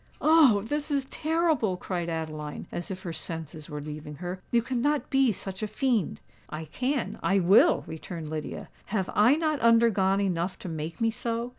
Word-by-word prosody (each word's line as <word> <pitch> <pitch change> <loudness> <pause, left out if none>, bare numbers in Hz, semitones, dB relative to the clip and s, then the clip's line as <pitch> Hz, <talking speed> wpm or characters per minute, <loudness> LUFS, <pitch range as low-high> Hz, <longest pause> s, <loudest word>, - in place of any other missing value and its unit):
"Oh! 300 -11 +5
this 295 +6 -3
is 280 -2 0
terrible!" 310 - 0
cried 175 -2 -3
Adeline, 155 -2 -4
as 175 - -5
if 185 -1 -6
her 170 - -4
senses 160 -1 -7
were 150 - -5
leaving 150 0 -7
her. 180 +4 -6
"You 235 -1 +2
cannot 265 +4 0
be 270 -3 +4
such 195 0 -5
a 215 - -1
fiend." 240 - 0 0.3
"I 155 +1 -5
can—I 250 - -1
will!" 190 +3 +5
returned 160 0 -7
Lydia. 155 0 -5 0.2
"Have 195 -3 -2
I 225 +7 +5
not 310 -2 0
undergone 230 -5 +4
enough 185 -2 -1
to 180 - -7
make 160 +5 -5
me 225 0 +3
so? 235 +1 -3
195 Hz, 170 wpm, -27 LUFS, 165-250 Hz, 0.3 s, Oh